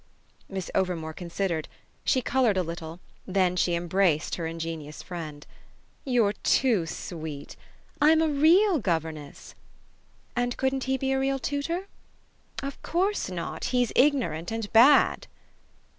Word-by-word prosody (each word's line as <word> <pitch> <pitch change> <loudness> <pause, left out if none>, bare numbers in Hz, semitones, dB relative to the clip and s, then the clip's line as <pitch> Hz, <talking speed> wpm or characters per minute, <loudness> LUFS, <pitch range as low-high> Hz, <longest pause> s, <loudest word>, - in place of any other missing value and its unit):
Miss 190 -2 -5
Overmore 170 -4 -1
considered; 170 -2 -3 0.4
she 255 - +2
coloured 245 -6 +2
a 185 - +2
little; 165 0 -7 0.3
then 185 -2 +2
she 175 -1 +1
embraced 170 -2 +1
her 165 -2 -2
ingenious 165 -2 -6
friend. 155 -5 -7 0.6
"You're 235 -6 +2
too 215 -5 +2
sweet! 155 -3 -7 0.5
I'm 315 +2 +6
a 320 - +3
REAL 325 +5 +4
governess." 160 - -4 0.8
"And 245 0 -1
couldn't 265 0 0
he 265 0 0
be 265 +1 -1
a 265 - +1
real 270 0 +1
tutor?" 285 +7 -2 0.8
"Of 275 0 -6
course 380 - 0
not. 175 -2 -4
He's 245 -2 +1
ignorant 250 - +2
and 225 -2 -4
bad." 250 +6 +6
195 Hz, 130 wpm, -27 LUFS, 165-265 Hz, 0.8 s, I'm